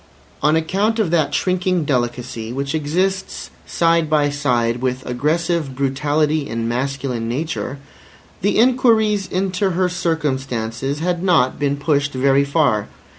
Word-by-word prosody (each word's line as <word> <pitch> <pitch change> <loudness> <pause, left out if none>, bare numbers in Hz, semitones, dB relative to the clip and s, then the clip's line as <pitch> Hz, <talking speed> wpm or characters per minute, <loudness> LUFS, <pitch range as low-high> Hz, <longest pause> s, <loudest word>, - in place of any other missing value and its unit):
On 150 +1 +3
account 195 +8 0
of 210 -7 0
that 155 -4 +2
shrinking 180 0 0
delicacy, 120 -4 -2
which 140 +2 -3
exists 180 +6 -2 0.2
side 165 -2 +2
by 150 -2 +2
side 125 -5 0
with 130 0 -2
aggressive 155 +3 -1
brutality 145 +2 0
in 115 0 -2
masculine 125 -1 -2
nature, 140 +1 -3 0.6
the 200 +3 +1
inquiries 220 -5 +3
into 190 +1 0
her 185 +1 +1
circumstances 135 -6 -2
had 175 0 -1
not 160 -9 +2
been 140 -1 0
pushed 145 0 0
very 135 +1 +3
far. 140 -8 +1
145 Hz, 125 wpm, -20 LUFS, 130-175 Hz, 0.6 s, On